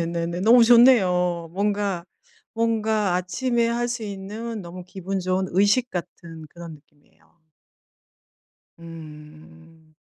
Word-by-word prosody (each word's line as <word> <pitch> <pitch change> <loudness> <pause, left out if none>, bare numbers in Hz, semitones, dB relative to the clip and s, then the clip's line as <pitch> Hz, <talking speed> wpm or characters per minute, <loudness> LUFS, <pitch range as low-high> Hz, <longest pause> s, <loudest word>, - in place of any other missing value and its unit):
네네네. 170 +1 -3
너무 230 +4 +6
좋네요. 180 -9 +4
뭔가 200 -2 -1 0.5
뭔가 220 -4 0
아침에 235 +7 0
할 240 +1 -1
수 240 -1 -4
있는 210 +2 -6
너무 175 +1 -9
기분 190 +1 -5
좋은 185 +1 -1
의식 205 +7 +2
같은 165 -2 -8
그런 170 -1 -10
느낌이에요. 145 +3 -26 1.4
음. 155 - -14
185 Hz, 220 characters per minute, -23 LUFS, 170-220 Hz, 1.4 s, 너무